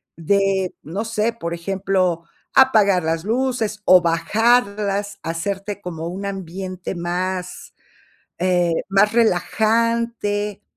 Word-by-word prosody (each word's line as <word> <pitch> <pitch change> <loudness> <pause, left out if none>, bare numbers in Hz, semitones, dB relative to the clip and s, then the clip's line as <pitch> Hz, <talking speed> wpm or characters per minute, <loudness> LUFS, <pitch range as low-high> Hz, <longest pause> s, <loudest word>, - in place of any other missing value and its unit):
de, 195 +2 +1
no 195 +8 -4
sé, 230 0 0
por 170 -7 -5
ejemplo, 185 -1 -1 0.3
apagar 210 -9 +5
las 165 +1 -1
luces, 230 -2 -1
o 185 -1 +7
bajarlas, 200 +3 +1
hacerte 195 +5 -3
como 165 -2 -5
un 190 +3 -5
ambiente 185 -1 -5
más, 180 +1 -4 0.7
eh, 175 -1 +2 0.2
más 200 +2 +3
relajante, 220 -1 +1
195 Hz, 100 wpm, -21 LUFS, 180-215 Hz, 0.7 s, o